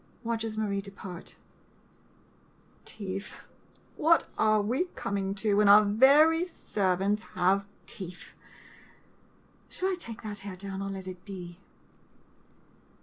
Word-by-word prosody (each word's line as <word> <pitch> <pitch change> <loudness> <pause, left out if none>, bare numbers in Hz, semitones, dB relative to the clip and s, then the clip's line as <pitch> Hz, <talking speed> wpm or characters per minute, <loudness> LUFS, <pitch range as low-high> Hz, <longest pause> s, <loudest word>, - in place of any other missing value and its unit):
[Watches 225 -1 -2
Marie 200 -2 -1
depart.] 195 -3 -10 1.5
Teeth! 195 -1 -6 0.6
What 330 +2 +4
are 215 0 +3
we 240 - 0
coming 195 0 -2
to, 205 +1 0
when 210 -1 +5
our 210 +1 +8
very 285 +10 +5
servants 200 - -1
have 190 +2 +2 0.2
teeth! 185 -4 -8 1.4
Shall 375 - -1
I 380 - 0
take 230 -8 -8
that 210 -1 -6
hair 195 -1 -7
down 195 +1 -6
or 195 - -3
let 190 -1 -6
it 185 -1 -8
be? 180 -3 -9
200 Hz, 115 wpm, -29 LUFS, 190-220 Hz, 1.5 s, our